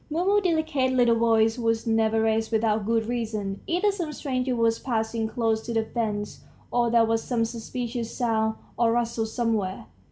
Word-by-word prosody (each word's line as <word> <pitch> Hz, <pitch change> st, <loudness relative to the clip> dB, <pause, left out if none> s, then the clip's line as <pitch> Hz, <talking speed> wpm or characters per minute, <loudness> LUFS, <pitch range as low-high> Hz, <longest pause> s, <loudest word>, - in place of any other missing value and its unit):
Mumu's 370 Hz, +6 st, +2 dB
delicate 315 Hz, -7 st, +1 dB
little 245 Hz, -2 st, +4 dB
voice 225 Hz, 0 st, +3 dB
was 225 Hz, -1 st, 0 dB
never 225 Hz, -1 st, +2 dB
raised 220 Hz, 0 st, +1 dB
without 220 Hz, -2 st, +1 dB
good 225 Hz, -1 st, +1 dB
reason; 215 Hz, -4 st, -3 dB
either 365 Hz, +5 st, +2 dB
some 350 Hz, -6 st, -4 dB
stranger 255 Hz, -4 st, -2 dB
was 230 Hz, -1 st, +2 dB
passing 225 Hz, -2 st, -1 dB
close 225 Hz, -1 st, 0 dB
to 230 Hz, +1 st, -5 dB
the 225 Hz, -, +2 dB
fence, 210 Hz, -3 st, -3 dB, 0.3 s
or 240 Hz, -1 st, +2 dB
there 230 Hz, -1 st, +4 dB
was 225 Hz, 0 st, +1 dB
some 235 Hz, -3 st, 0 dB
suspicious 235 Hz, 0 st, -4 dB
sound 220 Hz, -3 st, +1 dB, 0.2 s
or 230 Hz, -1 st, +3 dB
rustle 235 Hz, -1 st, 0 dB
somewhere. 220 Hz, -5 st, -1 dB
230 Hz, 165 wpm, -26 LUFS, 220-245 Hz, 0.3 s, little